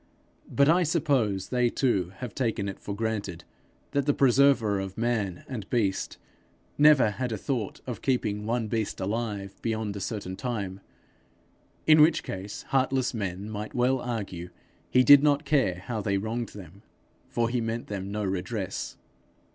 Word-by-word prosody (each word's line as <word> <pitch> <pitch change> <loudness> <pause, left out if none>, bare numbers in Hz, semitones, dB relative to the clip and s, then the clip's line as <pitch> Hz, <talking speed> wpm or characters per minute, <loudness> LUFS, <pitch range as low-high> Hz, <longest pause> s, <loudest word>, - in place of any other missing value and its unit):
But 140 0 +3
I 170 +4 +5
suppose 140 - +1
they 125 -1 +2
too 100 -10 0
have 120 +2 -7
taken 110 -6 -1
it 95 - -6
for 100 - -5
granted 100 -6 -3 0.5
that 140 0 0
the 145 - +3
Preserver 130 -6 +4
of 95 0 -5
man 110 -6 -1
and 110 -7 -6
beast 100 -6 0 0.6
never 145 -7 +6
had 125 +3 -3
a 110 - -2
thought 115 -2 -3
of 125 -4 -5
keeping 105 -5 -1
one 115 -1 0
beast 110 -1 -2
alive 100 -1 -3
beyond 110 -3 -2
a - - -4
certain 100 -2 -4
time; 100 -6 -4 1.1
in 155 -1 +7
which 155 +2 +5
case 95 +2 -6
heartless 130 -1 +1
men 100 -2 -4
might 105 0 -6
well 130 +1 +2
argue 100 -8 -4 0.4
he 130 - +5
did 145 +1 +9
not 145 0 +2
care 130 -11 +1
how 115 -3 -3
they 100 -1 0
wronged 110 +3 -3
them, 100 -1 -12 0.5
for 115 -1 0
he 120 0 -1
meant 115 +1 -3
them 100 -1 -5
no 105 +1 -2
redress. 95 +1 -3
110 Hz, 160 wpm, -27 LUFS, 100-130 Hz, 1.1 s, did